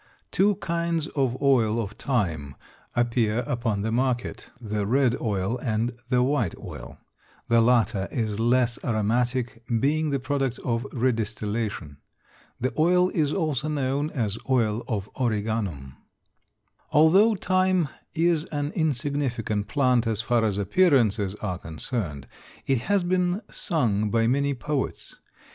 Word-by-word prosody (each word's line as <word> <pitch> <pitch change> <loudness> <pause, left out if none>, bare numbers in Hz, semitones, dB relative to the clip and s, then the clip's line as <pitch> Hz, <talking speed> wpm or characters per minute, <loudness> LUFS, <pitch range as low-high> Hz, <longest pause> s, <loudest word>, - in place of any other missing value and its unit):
Two 200 +1 +3
kinds 170 -2 -1
of 130 -4 -1
oil 115 -5 +3
of 105 -3 -3
thyme 85 - -2 0.4
appear 120 -1 +1
upon 115 -4 -1
the 110 - -1
market, 125 +1 -1
the 105 -3 -2
red 125 +1 +3
oil 105 +1 -1
and 115 0 -1
the 125 -1 +3
white 125 - 0
oil. - - -9 0.5
The 115 0 +5
latter 115 -5 +2
is 110 -3 -2
less 120 +1 +2
aromatic 120 +2 0 0.2
being 155 +4 +1
the 140 -1 0
product 135 -1 -1
of 120 +1 -1
redistillation. 110 - -2 0.6
The 130 - -1
oil 180 +3 +4
is 150 -4 +1
also 155 -5 -1
known 145 0 -1
as 115 -7 -2
oil 115 -3 +1
of 105 -4 -2
origanum. 105 - -2 0.9
Although 190 +9 +5
thyme 185 -3 +2 0.3
is 165 -1 +2
an 145 0 -3
insignificant 130 - -1
plant 125 -4 +2
as 110 -2 0
far 115 0 +1
as 105 -3 0
appearances 110 - +2
are 95 -4 -4
concerned 80 - -5 0.4
it 135 -3 +2
has 200 -2 +3
been 180 +3 0
sung 110 - +1
by 115 +1 +2
many 140 +3 +1
poets. 135 +2 -4
120 Hz, 130 wpm, -25 LUFS, 110-145 Hz, 0.9 s, The